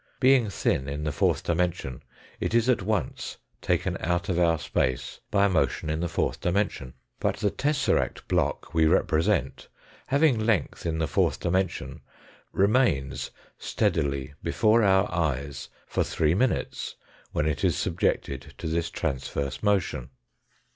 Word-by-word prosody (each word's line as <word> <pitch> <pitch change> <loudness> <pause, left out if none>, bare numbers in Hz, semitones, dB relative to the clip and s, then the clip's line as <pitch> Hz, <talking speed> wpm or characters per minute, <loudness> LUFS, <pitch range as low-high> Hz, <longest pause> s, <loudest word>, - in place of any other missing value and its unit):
Being 130 -4 +5
thin 70 -7 0
in 75 +2 -4
the 75 - -1
fourth 70 - +1
dimension 85 -7 -1 0.4
it - - -1
is 120 0 +3
at 125 -4 +3
once 105 +1 -2 0.2
taken - - 0
out 85 +2 -1
of 90 -2 +1
our 85 -2 +3
space 65 -2 -1
by 100 -1 +3
a - - +3
motion 75 -3 0
in 80 - -1
the 85 - -1
fourth - - -1
dimension. 90 -8 -1 0.2
But - - 0
the 100 - 0
tesseract 145 -1 0
block - - 0
we 80 -1 +4
represent 80 0 +1 0.4
having 140 -3 +3
length 110 -6 0
in 80 -1 -1
the 80 0 0
fourth - - +1
dimension 95 +2 -1 0.5
remains 100 - +2 0.3
steadily 70 0 -1
before 110 +1 +3
our 95 -2 +4
eyes 70 -5 -2 0.2
for - - 0
three 80 0 +1
minutes, 125 +7 -1 0.4
when 75 - 0
it 75 -2 -1
is - - +2
subjected 70 +1 -1
to 95 - -8
this 80 +1 -1
transverse 70 -3 -3
motion. 100 - 0
85 Hz, 145 wpm, -27 LUFS, 70-105 Hz, 0.5 s, Being